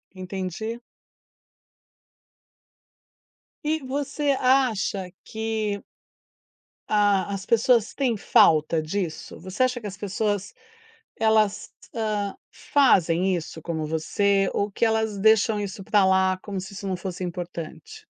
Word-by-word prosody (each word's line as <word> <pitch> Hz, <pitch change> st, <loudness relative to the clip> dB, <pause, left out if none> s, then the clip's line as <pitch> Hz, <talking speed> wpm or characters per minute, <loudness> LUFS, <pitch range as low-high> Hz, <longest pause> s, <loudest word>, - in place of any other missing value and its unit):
Entendi. 190 Hz, +4 st, -5 dB, 2.9 s
E 310 Hz, +1 st, +1 dB
você 280 Hz, +2 st, -1 dB
acha 225 Hz, -8 st, +1 dB
que 220 Hz, -2 st, -2 dB, 1.1 s
A 205 Hz, -3 st, +3 dB
as 195 Hz, -1 st, -5 dB
pessoas 230 Hz, 0 st, +3 dB
têm 255 Hz, -5 st, 0 dB
falta 160 Hz, -4 st, +4 dB
disso? 165 Hz, 0 st, -4 dB
Você 185 Hz, +8 st, -1 dB
acha 255 Hz, -1 st, 0 dB
que 210 Hz, -, -5 dB
as 200 Hz, -, -8 dB
pessoas, 205 Hz, +1 st, -2 dB, 0.6 s
elas, 215 Hz, -2 st, +2 dB, 0.2 s
hã, 210 Hz, -3 st, -2 dB, 0.2 s
fazem 185 Hz, -, +3 dB
isso 160 Hz, -1 st, -7 dB
como 160 Hz, -2 st, -3 dB
você, 195 Hz, +6 st, +1 dB
ou 205 Hz, +1 st, -1 dB
que 200 Hz, -, 0 dB
elas 220 Hz, -2 st, 0 dB
deixam 220 Hz, 0 st, +4 dB
isso 200 Hz, 0 st, -5 dB
pra 205 Hz, 0 st, +3 dB
lá 190 Hz, 0 st, +3 dB
como 200 Hz, -2 st, -4 dB
se 190 Hz, +2 st, -9 dB
isso 200 Hz, 0 st, -7 dB
não 185 Hz, -, -1 dB
fosse 185 Hz, 0 st, -5 dB
importante? 180 Hz, -, -7 dB
205 Hz, 115 wpm, -25 LUFS, 185-220 Hz, 2.9 s, falta